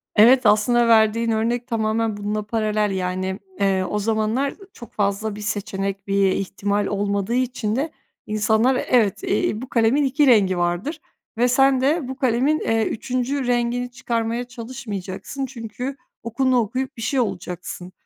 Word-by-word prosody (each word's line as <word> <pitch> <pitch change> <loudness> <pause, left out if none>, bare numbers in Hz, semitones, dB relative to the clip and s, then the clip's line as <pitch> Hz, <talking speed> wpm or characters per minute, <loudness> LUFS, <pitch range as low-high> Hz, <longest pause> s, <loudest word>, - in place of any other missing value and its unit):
Evet 245 +4 +6
aslında 230 +3 +4
verdiğin 225 +1 +4
örnek 235 +2 0
tamamen 220 -2 0
bununla 210 +1 -2
paralel. 215 -1 0
Yani, 185 0 -2 0.2
eee, 195 -1 +2
o 210 - -1
zamanlar 225 +6 0 0.2
çok 235 - -12
fazla 205 +1 -1
bir 210 - -8
seçenek, 200 -1 -3
bir 195 -1 +3
ihtimal 200 +2 -1
olmadığı 200 +2 -1
için 250 -4 -1
de 295 +5 -1 0.4
insanlar 220 +4 +2
evet, 225 -6 +2
eee, 210 +2 0
bu 260 - -8
kalemin 235 +5 +3
2 280 +2 +2
rengi 200 -7 +4
vardır 175 - -2 0.4
ve 245 +1 +3
sen 265 +1 +4
de 290 +1 +1
bu 265 - -5
kalemin, 260 +4 +1
eee, 225 0 +1
3. 255 +3 -2
rengini 245 0 0
çıkarmaya 235 -1 -2
çalışmayacaksın 230 -1 -6
çünkü 250 +1 -6 0.3
okulunu 255 +3 +1
okuyup 255 +4 -2
bir - - -7
şey 265 +4 0
olacaksın 180 -4 -4
225 Hz, 145 wpm, -22 LUFS, 205-250 Hz, 0.4 s, Evet